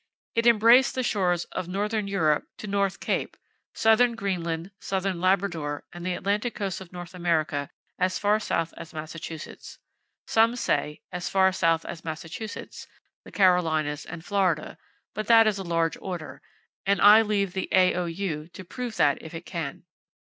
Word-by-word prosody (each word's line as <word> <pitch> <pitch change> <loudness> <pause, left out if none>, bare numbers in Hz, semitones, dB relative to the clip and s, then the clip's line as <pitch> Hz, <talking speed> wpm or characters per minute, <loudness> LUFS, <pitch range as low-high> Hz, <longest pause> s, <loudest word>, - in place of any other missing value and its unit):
It 230 +1 +2
embraced 235 +4 +6
the 255 - 0
shores 180 -6 +1
of 185 -2 -4
northern 205 +3 -1
Europe 160 -7 +1
to - - -8
North 200 -1 0
Cape, - - -2 0.4
southern 230 +2 +4
Greenland, 175 -4 -3
southern 190 -2 -2
Labrador, 170 -6 0
and 175 0 -8
the 180 0 -1
Atlantic 205 +6 -1
coast 195 -3 -3
of 185 - -11
North 175 0 -8
America 155 -5 0 0.3
as 185 0 +1
far 210 +1 +2
south 165 -6 -1
as 165 -1 -10
Massachusetts. 160 +1 -8 0.5
Some 225 +2 +3
say, 150 -10 -1
"as 180 -1 -4
far 190 -1 +4
south 165 -3 +1
as 165 - -7
Massachusetts, 165 +6 -7 0.4
the - - -12
Carolinas 160 -6 +2
and 165 0 -8
Florida," 185 -6 0 0.3
but 215 0 -4
that 225 -1 +7
is 210 -2 +1
a - - -4
large 165 -2 0
order, 175 -4 -6 0.4
and 200 +1 +2
I 210 +2 +8
leave 200 -4 0
the 190 - -3
A.O.U. 180 -3 +1
to 180 +2 -11
prove 245 +4 -5
that 145 -1 +3
if 160 +1 -9
it 165 +1 -7
can. 160 -6 -5
185 Hz, 160 wpm, -26 LUFS, 165-205 Hz, 0.5 s, I